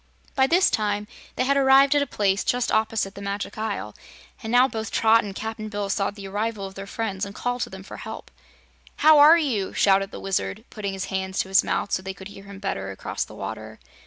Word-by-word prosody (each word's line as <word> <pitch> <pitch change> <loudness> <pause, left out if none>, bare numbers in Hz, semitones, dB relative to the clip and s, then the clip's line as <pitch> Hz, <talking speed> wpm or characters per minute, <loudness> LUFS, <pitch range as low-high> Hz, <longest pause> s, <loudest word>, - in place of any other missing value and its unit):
By 265 -1 +3
this 355 +5 +4
time 205 -1 -1 0.3
they - - +1
had 280 +2 +2
arrived 270 +1 +6
at 290 - +3
a 285 - -1
place 195 -4 0
just 245 0 0
opposite 220 -2 0
the 200 - -10
Magic 200 +1 -4
Isle, 205 - -4 0.5
and 220 - -5
now 250 +2 +6
both 220 -3 -5
Trot 225 +1 +4
and 200 -2 -7
Cap'n 220 0 -5
Bill 205 -1 -3
saw 200 -1 0
the 200 -1 -9
arrival 205 +1 -3
of 190 - -8
their 195 +1 -8
friends 200 -2 -3
and 200 0 -5
called 245 0 -2
to - - -2
them 190 0 -10
for - - -10
help. - - -8 0.7
"How 310 -1 +8
are 305 +3 +9
you?" 240 - -1
shouted 195 0 +3
the - - -9
Wizard, 195 +3 -2
putting 200 -3 -4
his 190 -1 -4
hands 190 0 -2
to 190 - -7
his 195 - +5
mouth - - -2
so - - 0
they 190 0 -6
could 190 0 -10
hear 195 -1 -12
him 200 0 -10
better 95 - -3
across 95 - -4
the - - -12
water. - - -7
205 Hz, 230 wpm, -24 LUFS, 195-230 Hz, 0.7 s, are